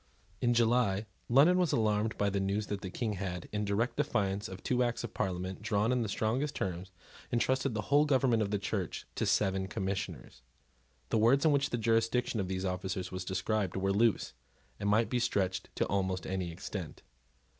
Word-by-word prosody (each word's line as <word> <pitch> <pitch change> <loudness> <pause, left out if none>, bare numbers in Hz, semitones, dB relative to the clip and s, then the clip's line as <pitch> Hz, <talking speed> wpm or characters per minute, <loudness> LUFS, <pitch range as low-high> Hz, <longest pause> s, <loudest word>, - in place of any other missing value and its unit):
In 120 -1 +2
July 115 -3 +2 0.2
London 150 +9 +6
was 175 -4 +2
alarmed 110 -1 +1
by 100 -1 +1
the 100 - 0
news 100 +2 0
that 100 - -4
the 95 - -5
King 110 +2 -2
had, 90 -3 -4
in 105 0 -1
direct 105 +4 0
defiance 105 -8 0
of 95 0 -9
two 125 -1 +1
acts 120 -1 0
of 120 - -6
Parliament 95 +1 -3
drawn 105 +1 +1
in 125 -1 +2
the 110 - -2
strongest 125 +9 -1
terms, 95 0 -3 0.4
entrusted 130 +1 +1
the 105 - 0
whole 145 +4 +4
government 130 -5 +3
of 105 - 0
the 105 - 0
Church 100 -2 -3
to - - -1
seven 95 -1 +1
Commissioners. 95 - -4 0.7
The 110 - +2
words 130 +7 +4
in 155 - +6
which 140 -1 +2
the 120 - -1
jurisdiction 115 +1 +1
of 95 - -1
these 95 0 -2
officers 95 0 -3
was 95 0 -4
described 95 0 -1
were 95 +1 +1
loose, 110 +1 +2 0.5
and 100 0 0
might 110 +2 +3
be 125 - +2
stretched 95 -5 0
to - - +1
almost 95 -2 -1
any 95 -2 -2
extent. 95 -1 -7
105 Hz, 190 wpm, -32 LUFS, 95-120 Hz, 0.7 s, London